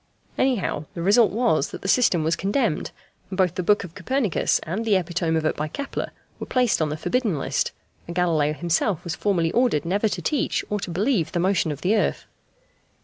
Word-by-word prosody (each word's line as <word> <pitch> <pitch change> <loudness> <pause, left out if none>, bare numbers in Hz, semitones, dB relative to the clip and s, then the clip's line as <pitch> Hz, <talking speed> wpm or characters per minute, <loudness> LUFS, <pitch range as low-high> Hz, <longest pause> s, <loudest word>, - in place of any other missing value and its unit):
Anyhow, 230 - 0
the 170 - -4
result 205 +3 +5
was 210 - +1
that - - -9
the - - -3
system 190 -7 +3
was 160 +2 +1
condemned, 200 - 0 0.4
and 185 - -6
both 185 -3 +2
the 185 - -2
book 205 +3 +2
of 175 -3 -9
Copernicus 215 +2 0
and 185 +7 -3
the 220 -3 +2
epitome 170 -2 0
of 160 - -1
it 155 - +1
by 150 - -2
Kepler 280 - -4 0.3
were - - -6
placed 250 -8 +2
on 155 - +1
the 150 - -3
forbidden 225 - 0
list, - - -1 0.4
and 170 - -6
Galileo 160 -4 +2
himself 170 +3 0
was 170 - -3
formally 170 -3 0
ordered 240 - +2
never 200 +5 +1
to - - -3
teach 295 -4 0
or 210 - 0
to 200 - -5
believe 195 - 0
the 175 - 0
motion 180 -3 +1
of 145 - -6
the 195 +5 +2
earth. 215 - 0
185 Hz, 205 wpm, -24 LUFS, 165-215 Hz, 0.4 s, result